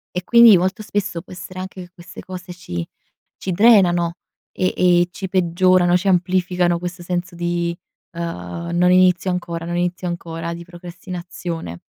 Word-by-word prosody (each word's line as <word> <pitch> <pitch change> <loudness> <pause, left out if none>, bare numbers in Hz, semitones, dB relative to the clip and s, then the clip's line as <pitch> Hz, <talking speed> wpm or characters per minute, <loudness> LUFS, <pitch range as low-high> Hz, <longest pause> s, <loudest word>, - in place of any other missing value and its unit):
e 180 - -2
quindi, 235 -3 +7
molto 190 +4 -1
spesso 200 -5 -3
può 185 - -13
essere 185 0 -9
anche 185 0 -7
che 175 - -14
queste 175 -1 -12
cose 180 -1 -8
ci 85 - -6 0.5
ci 190 - -4
drenano 175 -5 +4 0.4
e 185 - -1
e 175 -1 +4
ci 190 0 -6
peggiorano, 180 -1 +3
ci 185 +2 0
amplificano 180 -1 +1
questo 175 0 -6
senso 180 0 -3
di, 170 0 -2 0.4
ehm 165 - -5 0.2
non 180 +1 +3
inizio 185 0 +4
ancora 170 -2 -4
non 175 0 -3
inizio 180 +1 -2
ancora 170 -1 -5
di 170 - -8
procrastinazione. 175 - -7
175 Hz, 155 wpm, -20 LUFS, 170-185 Hz, 0.5 s, quindi